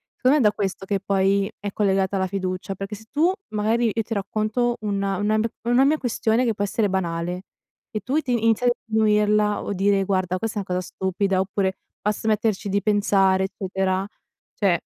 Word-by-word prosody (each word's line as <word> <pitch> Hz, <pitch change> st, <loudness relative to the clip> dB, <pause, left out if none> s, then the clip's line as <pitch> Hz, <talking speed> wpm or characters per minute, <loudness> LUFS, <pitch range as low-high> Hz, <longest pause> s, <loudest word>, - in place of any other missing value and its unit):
Secondo 265 Hz, +4 st, +3 dB
me 245 Hz, -, +2 dB
è 210 Hz, -, +7 dB
da -, -, -6 dB
questo 195 Hz, -1 st, -3 dB
che 195 Hz, 0 st, 0 dB
poi 195 Hz, +1 st, +1 dB
è 205 Hz, 0 st, -4 dB
collegata 195 Hz, -1 st, +1 dB
la 190 Hz, -, 0 dB
fiducia, 185 Hz, 0 st, -3 dB
perché 195 Hz, +2 st, -5 dB
se 220 Hz, +2 st, -14 dB
tu 315 Hz, +4 st, +3 dB, 0.2 s
magari 220 Hz, +2 st, +1 dB
io 225 Hz, -, 0 dB
ti 225 Hz, -, -4 dB
racconto 215 Hz, +4 st, -1 dB
una 200 Hz, -2 st, -1 dB
una 215 Hz, +1 st, +1 dB
m 215 Hz, -, +2 dB, 0.2 s
una 245 Hz, +3 st, +4 dB
mia 305 Hz, +3 st, +3 dB
questione 235 Hz, -2 st, +1 dB
che 230 Hz, -, +1 dB
può 205 Hz, -, -2 dB
essere 205 Hz, +1 st, 0 dB
banale 180 Hz, -1 st, -2 dB, 0.5 s
e 215 Hz, -, -3 dB
tu 260 Hz, +9 st, 0 dB
ti 265 Hz, -5 st, -2 dB
inizi 230 Hz, 0 st, +2 dB
a -, -, +6 dB, 0.2 s
sminuirla 210 Hz, -1 st, +2 dB
o 205 Hz, -, -3 dB
dire: 195 Hz, +1 st, +2 dB
"Guarda 185 Hz, -1 st, 0 dB
questa 220 Hz, 0 st, -2 dB
è -, -, -2 dB
una 180 Hz, -, -1 dB
cosa 185 Hz, -, -6 dB
stupida" 190 Hz, 0 st, 0 dB
oppure 190 Hz, 0 st, -1 dB, 0.2 s
"Basta 210 Hz, +1 st, -1 dB
metterci 215 Hz, -2 st, +1 dB
di 200 Hz, +1 st, +1 dB
pensare" 195 Hz, -2 st, +3 dB
eccetera. 190 Hz, 0 st, -2 dB, 0.5 s
Cioè 185 Hz, -5 st, +2 dB
205 Hz, 195 wpm, -23 LUFS, 190-220 Hz, 0.5 s, è